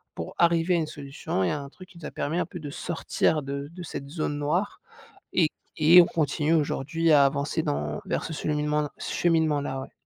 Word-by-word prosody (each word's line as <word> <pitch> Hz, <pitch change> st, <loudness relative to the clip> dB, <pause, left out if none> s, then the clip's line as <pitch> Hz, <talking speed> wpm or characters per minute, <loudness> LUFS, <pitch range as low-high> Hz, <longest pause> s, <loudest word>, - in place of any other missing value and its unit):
pour 80 Hz, -, -6 dB
arriver 170 Hz, +1 st, +3 dB
à -, -, +3 dB
une 160 Hz, -2 st, -1 dB
solution 140 Hz, -9 st, -4 dB
et -, -, +1 dB
à 150 Hz, -, -2 dB
un 140 Hz, -, -9 dB
truc 185 Hz, +5 st, -14 dB
qui 175 Hz, -, -16 dB
nous 155 Hz, -, -9 dB
a -, -, -5 dB
permis 155 Hz, +4 st, -2 dB
un -, -, 0 dB
peu 175 Hz, -, -9 dB
de 145 Hz, -2 st, -6 dB
sortir 160 Hz, 0 st, 0 dB
de 140 Hz, +1 st, -5 dB
de 180 Hz, +1 st, -10 dB
cette 140 Hz, -3 st, -7 dB
zone 150 Hz, -2 st, -2 dB
noire, 165 Hz, +8 st, -1 dB, 0.5 s
et 165 Hz, -4 st, +3 dB
q -, -, -45 dB, 0.3 s
et 170 Hz, +4 st, +8 dB
on -, -, +2 dB
continue 155 Hz, 0 st, 0 dB
aujourd'hui 160 Hz, +2 st, 0 dB
à 140 Hz, -2 st, +7 dB
avancer 140 Hz, +1 st, -1 dB
dans 75 Hz, +1 st, -2 dB
vers -, -, -2 dB
ce 160 Hz, -, -5 dB
cheminement-là 150 Hz, -1 st, -1 dB
cheminement-là, 155 Hz, -5 st, 0 dB
ouais. -, -, -9 dB
150 Hz, 215 wpm, -26 LUFS, 140-165 Hz, 0.5 s, et